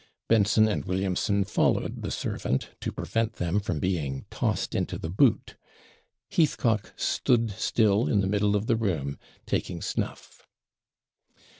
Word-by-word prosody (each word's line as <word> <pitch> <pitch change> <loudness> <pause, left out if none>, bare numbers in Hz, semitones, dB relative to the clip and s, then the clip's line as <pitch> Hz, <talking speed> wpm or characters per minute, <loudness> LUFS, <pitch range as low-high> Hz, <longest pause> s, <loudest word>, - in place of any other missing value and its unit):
Benson 110 0 +4
and 105 - -1
Williamson 95 +2 0
followed 100 - 0
the - - -3
servant, 65 - -2
to - - -3
prevent 115 0 -1
them 90 +3 0
from 105 +1 -3
being 75 -8 -2
tossed - - -1
into - - -1
the 80 - -5
boot. 115 +4 +2 0.8
Heathcock 115 -9 +1
stood 115 -3 +1
still 105 +1 +2
in 105 - +2
the 95 - +1
middle 105 +1 +2
of 105 +1 0
the 115 - +2
room 80 -11 -2 0.3
taking - - -2
snuff. - - -5
100 Hz, 135 wpm, -27 LUFS, 95-110 Hz, 0.8 s, Benson